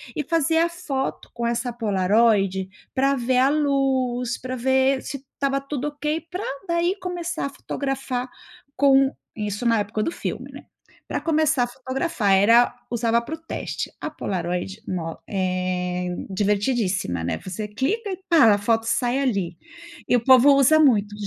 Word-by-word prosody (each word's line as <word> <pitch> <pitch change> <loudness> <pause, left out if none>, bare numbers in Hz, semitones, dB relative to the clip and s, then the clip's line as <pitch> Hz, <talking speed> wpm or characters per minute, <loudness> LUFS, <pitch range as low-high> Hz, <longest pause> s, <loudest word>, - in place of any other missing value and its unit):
e 300 - -1
fazia 330 0 +3
a - - -2
foto 285 -6 -4
com 235 0 -3
essa 235 +1 -1
Polaroid 200 -2 +2 0.2
pra 275 +1 +2
ver 250 0 0
a 265 +2 +4
luz, 265 -4 0
pra 255 0 -5
ver 265 +1 +2
se 280 - -5 0.2
estava 275 0 0
tudo 280 +1 -4
ok, 300 +2 -3
pra 365 +3 -4 0.3
daí 340 +3 +1
começar 345 -4 -3
a - - -5
fotografar 270 -2 -4 0.5
com 270 0 +5 0.2
isso 210 +1 -4
na 230 -2 +3
época 210 +1 -2
do 330 - -1
filme, - - -5
né. - - -10 0.4
Pra - - -3
começar, 310 -4 +2
a - - -1
fotografar 260 - -2
era 230 +6 +5 0.2
usava 235 0 +1
pro 315 +7 -6
teste. 325 +1 -5
A - - -4
Polaroid 180 +2 -4
no 165 -3 -4
é 180 -1 -1 0.2
divertidíssima, 195 - 0
né. 85 - -1
Você 200 +3 -4
clica 385 - -2
e 375 - -4
pá, 295 -11 +6
a - - +2
foto 225 +2 +1
sai 245 +3 +1
ali. 195 -10 -1 0.5
E - - +3
o 240 - +1
povo 265 +2 +7
usa 275 +3 +5
muito. 210 -9 +3
250 Hz, 160 wpm, -23 LUFS, 205-280 Hz, 0.5 s, povo